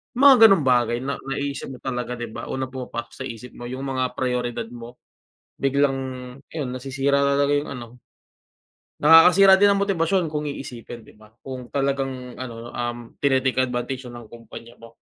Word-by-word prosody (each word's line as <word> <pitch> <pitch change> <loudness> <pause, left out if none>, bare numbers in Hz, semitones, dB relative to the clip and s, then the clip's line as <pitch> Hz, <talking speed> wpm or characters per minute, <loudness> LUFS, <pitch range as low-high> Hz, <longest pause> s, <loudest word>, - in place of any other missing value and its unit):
Mga 275 +1 +8
gano'ng 195 -8 +4
bagay 120 -2 +2
na 140 +1 -3
naiisip 140 +1 -3
mo - - -17
talaga, 125 -1 -3
'di 120 -2 -6
ba? 115 - -7
Unang 130 -1 -4
pumapasok 125 -2 -6
sa 130 - -4
isip 120 +1 -9
mo, 120 - -9
yung 130 +2 -6
mga 130 -2 -2
prayoridad 125 -2 -2
mo, 120 +1 -10 0.7
biglang 140 0 +2 0.5
ayun, 145 -6 -4
nasisira 135 +2 0
na 140 0 +2
talaga 145 0 +2
yung 150 - -8
ano. 120 - -8 1.2
Nakakasira 180 +5 +8
din 205 - +6
ng 200 - 0
motibasyon 180 -3 0
kung 150 0 -3
iisipin, 120 -4 -8
'di - - -19
ba? 110 - -17 0.2
Kung 130 -2 -7
talagang 135 -2 -3
ano, 120 -2 -7
um, 120 0 -3 0.2
tini-take 130 -2 +2
advantage 125 +1 -4
na 120 -1 -9
ng 110 - -18
kumpanya 120 0 -12
mo. 115 0 -15
130 Hz, 170 wpm, -23 LUFS, 120-140 Hz, 1.2 s, Mga